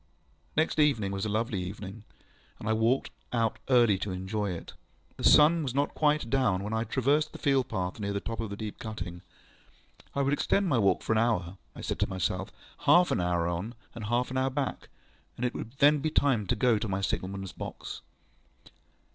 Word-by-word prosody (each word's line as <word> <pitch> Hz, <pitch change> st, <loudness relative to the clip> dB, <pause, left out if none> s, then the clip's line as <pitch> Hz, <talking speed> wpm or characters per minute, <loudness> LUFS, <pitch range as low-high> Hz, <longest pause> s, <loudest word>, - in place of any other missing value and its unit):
Next 155 Hz, 0 st, +2 dB
evening 115 Hz, -10 st, +3 dB
was 95 Hz, +1 st, -2 dB
a -, -, -1 dB
lovely 110 Hz, -2 st, -1 dB
evening, 100 Hz, +3 st, -7 dB, 0.5 s
and -, -, -7 dB
I 110 Hz, -, +3 dB
walked 115 Hz, +4 st, +1 dB, 0.2 s
out 115 Hz, -2 st, 0 dB
early 120 Hz, -6 st, +5 dB
to 100 Hz, -, -3 dB
enjoy 95 Hz, +3 st, -2 dB
it. 85 Hz, -2 st, -6 dB, 0.4 s
The -, -, -7 dB
sun 160 Hz, +3 st, +6 dB
was 135 Hz, -4 st, -3 dB
not 140 Hz, +1 st, +2 dB
yet -, -, -23 dB
quite 150 Hz, -4 st, +2 dB
down 125 Hz, -9 st, +2 dB
when 105 Hz, +2 st, -4 dB
I 110 Hz, +1 st, 0 dB
traversed 140 Hz, +6 st, +1 dB
the -, -, -7 dB
field 135 Hz, -2 st, +1 dB
path 90 Hz, -1 st, -3 dB
near 100 Hz, -1 st, -2 dB
the 100 Hz, -, -1 dB
top 115 Hz, +2 st, -5 dB
of 115 Hz, -2 st, -3 dB
the 100 Hz, -, -5 dB
deep 105 Hz, 0 st, -6 dB
cutting. 90 Hz, -6 st, -6 dB, 0.9 s
I 140 Hz, -, +2 dB
would 140 Hz, +1 st, +1 dB
extend 195 Hz, +6 st, +1 dB
my 130 Hz, -8 st, +2 dB
walk 100 Hz, -3 st, +2 dB
for -, -, -2 dB
an 110 Hz, -, +4 dB
hour, 95 Hz, -6 st, 0 dB, 0.2 s
I -, -, -8 dB
said -, -, -3 dB
to -, -, +1 dB
myself, 95 Hz, -2 st, -2 dB, 0.3 s
half 175 Hz, 0 st, +5 dB
an -, -, +1 dB
hour 85 Hz, -1 st, +1 dB
on 90 Hz, +8 st, -3 dB, 0.2 s
and 115 Hz, -2 st, -6 dB
half 120 Hz, +2 st, 0 dB
an 130 Hz, -, 0 dB
hour 130 Hz, 0 st, +1 dB
back, 135 Hz, 0 st, -3 dB, 0.5 s
and 125 Hz, -, -1 dB
it 125 Hz, -, -1 dB
would 115 Hz, -, -6 dB
then 145 Hz, +2 st, +5 dB
be 155 Hz, +3 st, 0 dB
time 130 Hz, -9 st, +2 dB
to 120 Hz, -, +1 dB
go 115 Hz, -1 st, +3 dB
to 110 Hz, -, -3 dB
my 95 Hz, -1 st, -1 dB
signal 95 Hz, -1 st, -1 dB
manŌĆÖs 95 Hz, -1 st, -6 dB
box. -, -, -7 dB
110 Hz, 215 wpm, -29 LUFS, 100-135 Hz, 0.9 s, sun